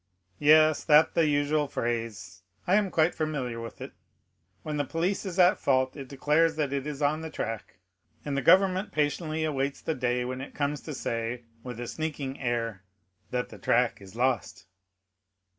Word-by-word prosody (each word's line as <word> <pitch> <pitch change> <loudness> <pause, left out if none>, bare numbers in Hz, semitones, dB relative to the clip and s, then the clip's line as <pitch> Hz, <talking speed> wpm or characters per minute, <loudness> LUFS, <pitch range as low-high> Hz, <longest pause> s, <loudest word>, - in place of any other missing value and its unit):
"Yes, 155 +1 +5
that 150 0 +6
the 165 -2 +3
usual 145 0 +1
phrase; 115 -7 -4 0.2
I 180 - +1
am 205 -1 +3
quite 165 0 +2
familiar 135 -7 -3
with 115 - -9
it. - - -6 0.7
When 150 -1 -3
the 145 - +1
police 175 +7 -1
is 180 -1 -5
at 180 -1 +5
fault, 130 -1 +1
it 135 -3 -8
declares 150 +4 +2
that 145 -3 -1
it 140 0 -2
is 150 -1 -4
on 150 +2 +1
the 160 - -5
track; 115 -9 -5 0.5
and 145 -2 -2
the 140 - 0
government 190 - +4
patiently 155 +1 -1
awaits 140 -2 -1
the 160 - -2
day 125 -2 -1
when 130 +1 -4
it 135 - -9
comes 145 0 -1
to 155 - -6
say, 120 -1 -3 0.2
with 125 -2 -7
a 120 - -4
sneaking 145 -1 -4
air, 115 -6 -2 0.5
that 125 0 -2
the - - -12
track 120 -2 +1
is 95 +1 -13
lost." 110 -5 -1
140 Hz, 175 wpm, -28 LUFS, 125-155 Hz, 0.7 s, that